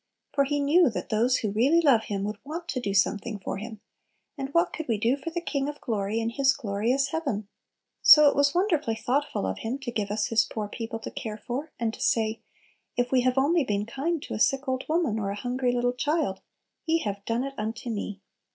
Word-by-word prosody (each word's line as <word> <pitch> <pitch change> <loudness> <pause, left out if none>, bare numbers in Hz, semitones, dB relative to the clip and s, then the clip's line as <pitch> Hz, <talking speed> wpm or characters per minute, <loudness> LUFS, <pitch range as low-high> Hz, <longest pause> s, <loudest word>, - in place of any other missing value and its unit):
For 280 -1 +3
He 290 +1 0
knew 300 +3 +4
that 225 - -5
those 235 +4 +2
who 215 - -2
really 260 +11 +4
love 270 -9 +4
Him 200 -1 -3
would 205 0 -4
want 330 +4 -6
to 255 - -1
do 205 -5 -2
something 205 +3 +1
for 195 - -4
Him, 215 +1 -8 0.5
and 270 -3 -4
what 335 +3 +2
could 320 - -5
we 230 -3 +1
do 230 +5 +2
for 285 +4 -6
the 340 +1 -3
King 280 -4 -2
of 295 - -7
glory 215 -2 -1
in 230 0 -1
His 270 +2 +3
glorious 230 +6 0
heaven? 275 -10 -2 0.5
So 300 -1 +9
it 280 - +3
was 285 +1 +3
wonderfully 325 - +1
thoughtful 260 - -1
of 95 0 -3
Him 235 +4 -3
to 270 -3 -5
give 210 -3 -2
us 210 +1 -1
His 225 -1 +4
poor 215 -2 -4
people 225 +2 -5
to 225 - -7
care 215 -2 -5
for, 260 +7 -5
and 230 -2 -1
to - - -10
say, 220 -1 +1 0.6
if 245 0 0
we 260 -1 +4
have 255 +1 +1
only 305 +4 +3
been 205 -4 -1
kind 300 +8 -2
to - - -6
a 215 - -3
sick 270 +4 +2
old 260 0 -1
woman 315 -9 +1
or 200 -2 -2
hungry 245 +4 -1
little 245 0 +1
child, 290 - -1 0.5
"Ye 325 +1 +2
have 200 -1 -4
done 230 +2 0
it 275 0 -5
unto 225 +2 -4
me!" 205 -2 -4
245 Hz, 225 wpm, -27 LUFS, 215-285 Hz, 0.6 s, So